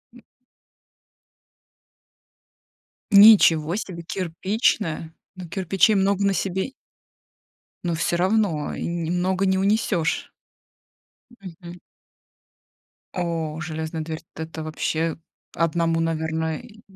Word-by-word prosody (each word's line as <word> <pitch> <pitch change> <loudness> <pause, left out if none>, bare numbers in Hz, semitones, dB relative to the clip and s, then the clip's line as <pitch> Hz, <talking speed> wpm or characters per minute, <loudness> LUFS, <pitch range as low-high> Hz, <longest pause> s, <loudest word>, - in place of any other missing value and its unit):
М. 245 - -15 2.9
Ничего 195 -6 +7
себе 175 -6 -6
кирпичная, 175 -2 -1 0.2
но 185 -2 -8
кирпичей 190 +4 +2
много 200 +1 +2
на 200 - +3
себе 190 +5 -2 1.1
Но 175 -1 -1
всё 170 +1 0
равно, 185 -5 +1
и - - -4
немного 175 +3 -1
не 190 0 +2
унесёшь. 195 -4 0 1.0
М, 240 - -19 0.2
мгм. 175 0 -10 1.3
О, 165 -3 -3
железная 160 0 -4
дверь-то- 160 0 -7
это 160 0 -7
вообще 160 +1 -2 0.4
1, 165 0 +1
наверное, 160 0 -1
и 225 -3 -15
170 Hz, 90 wpm, -23 LUFS, 160-195 Hz, 2.9 s, Ничего